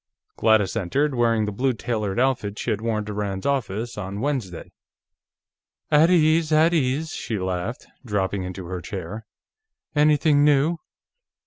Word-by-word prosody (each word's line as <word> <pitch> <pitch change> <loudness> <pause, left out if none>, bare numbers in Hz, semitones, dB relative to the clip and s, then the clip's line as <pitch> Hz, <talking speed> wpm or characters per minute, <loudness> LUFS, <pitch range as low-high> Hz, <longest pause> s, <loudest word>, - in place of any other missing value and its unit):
Gladys 110 -3 +3
entered, 135 +9 0
wearing 115 -3 +2
the 105 - -3
blue 130 +6 0
tailored 110 -3 -2
outfit 120 -6 0
she - - -2
had 105 - -2
worn 110 -2 -1
to 105 - -5
Rand's 100 -2 -3
office, 120 -5 -2
on 100 0 -5
Wednesday. 120 - -3 1.2
"At 150 +3 +6
ease, 160 -2 +3
at 160 +2 +4
ease," 150 +1 0
she 115 -3 -4
laughed, 95 +6 -3 0.2
dropping 100 -4 -1
into 90 0 -6
her 90 0 -5
chair. 95 +5 -7 0.7
"Anything 150 0 +4
new?" 150 +3 +3
115 Hz, 140 wpm, -23 LUFS, 100-145 Hz, 1.2 s, At